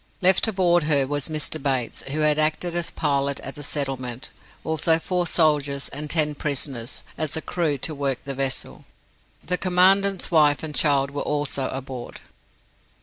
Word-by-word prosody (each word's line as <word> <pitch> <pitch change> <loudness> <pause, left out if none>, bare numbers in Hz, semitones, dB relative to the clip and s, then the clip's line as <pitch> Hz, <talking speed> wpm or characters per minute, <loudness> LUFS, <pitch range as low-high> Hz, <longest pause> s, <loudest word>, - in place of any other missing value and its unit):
Left 190 +3 +5
aboard 180 -4 +3
her 145 -3 +3
was 145 +1 -1
Mr. 155 -1 -2
Bates, 130 -4 -1
who 155 +3 -1
had 150 0 +3
acted 160 +3 0
as 175 -1 0
pilot 140 -2 -1
at 135 - -7
the 145 - -10
settlement, 135 -4 -3 0.3
also 160 +1 +2
four 180 +1 -1
soldiers, 145 -5 +1
and 150 +2 -6
ten 150 -1 +3
prisoners, 140 -4 -4 0.2
as 155 -1 -1
a - - 0
crew 160 -5 -1
to 155 +4 -1
work 140 -3 -1
the 140 - -5
vessel. 135 -1 -3 0.6
The 180 +2 0
Commandant's 190 +1 +3
wife 150 -3 +4
and 155 -1 -4
child 140 0 +3
were 145 - -4
also 145 -2 0
aboard." 130 -2 -7
150 Hz, 160 wpm, -24 LUFS, 140-160 Hz, 0.6 s, Left